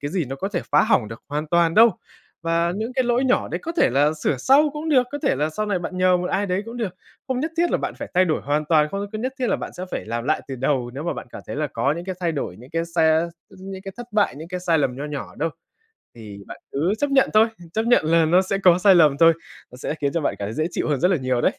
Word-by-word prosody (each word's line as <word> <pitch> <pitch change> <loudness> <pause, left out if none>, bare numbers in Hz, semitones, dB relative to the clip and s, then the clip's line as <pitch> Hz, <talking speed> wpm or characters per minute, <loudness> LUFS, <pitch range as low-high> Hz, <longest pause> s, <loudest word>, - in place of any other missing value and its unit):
cái 145 - -4
gì 175 -2 -1
nó 135 +2 -6
có 195 - -3
thể 180 -4 -2
phá 150 - +6
hỏng 110 - +2
được 115 +1 -10
hoàn 150 +2 -3
toàn 170 -1 +3
đâu. 230 +2 +7 0.5
Và 170 +1 +1
những 225 +4 -3
cái 260 -1 +1
lỗi 245 +2 +1
nhỏ 255 - +1
đấy - - -3
có 330 - -4
thể - - +4
là 145 +4 +3
sửa 150 -2 -1
sau 285 - +4
cũng 300 +2 -5
được, 270 -5 +5
có 290 - -3
thể - - +2
là 150 +2 0
sau 215 +7 -3
này 200 -3 0
bạn 180 +1 -5
nhờ 185 0 +4
một 180 0 -3
ai 200 +2 0
đấy 185 +2 -1
cũng 230 +1 -7
được, 215 -7 -3 0.3
không 255 -1 -1
nhất 315 +4 -2
thiết 345 +1 +2
là - - +2
bạn - - -4
phải - - -6
thay 185 +1 +5
đổi 160 -3 0
hoàn 150 +2 0
toàn, 150 -1 +3
không 200 +1 -3
có 215 - -4
nhất 255 +3 -2
thiết 255 - 0
là - - +1
bạn - - -7
sẽ 180 - -6
phải - - -4
làm 115 +1 -3
lại - - +1
từ 135 - -5
đầu 130 -1 -1
nếu 140 - -5
mà 170 - -1
bạn - - -7
cảm - - -9
thấy - - -6
là 150 - 0
có 135 +2 0
những 170 - -6
cái 190 0 -4
thay 170 -2 0
đổi, 135 - -4
những 125 +3 -14
cái 165 0 -1
sa 160 +1 +3 0.2
những 190 0 -9
cái 195 -1 -7
thất 240 0 -8
bại, 210 -1 +2
những 160 +3 -9
cái 180 0 -4
sai 170 -2 +2
lầm 130 -4 0
nho 140 - -5
nhỏ 150 -1 -6
đâu. 165 +2 0 0.6
Thì 105 -4 -10
bạn - - -10
cứ 160 +8 0
chấp 290 -1 0
nhận 270 -1 +3
thôi, 220 +1 +6 0.3
chấp 220 - 0
nhận 240 -9 +4
là 165 0 +4
nó 175 +4 +4
sẽ 195 +1 -2
có 180 -2 +5
sai 195 +1 +6
lầm 150 -5 +5
thôi, 165 +1 +7 0.4
nó - - -11
sẽ 130 - -4
khiến 140 -1 0
cho 170 - 0
bạn - - -1
cảm 100 - -3
thấy 105 - -5
dễ 155 - 0
chịu - - -2
hơn 145 -4 0
rất 180 - +4
là 185 - +3
nhiều 130 -3 -1
đấy. - - +1
170 Hz, 310 wpm, -22 LUFS, 145-200 Hz, 0.6 s, đâu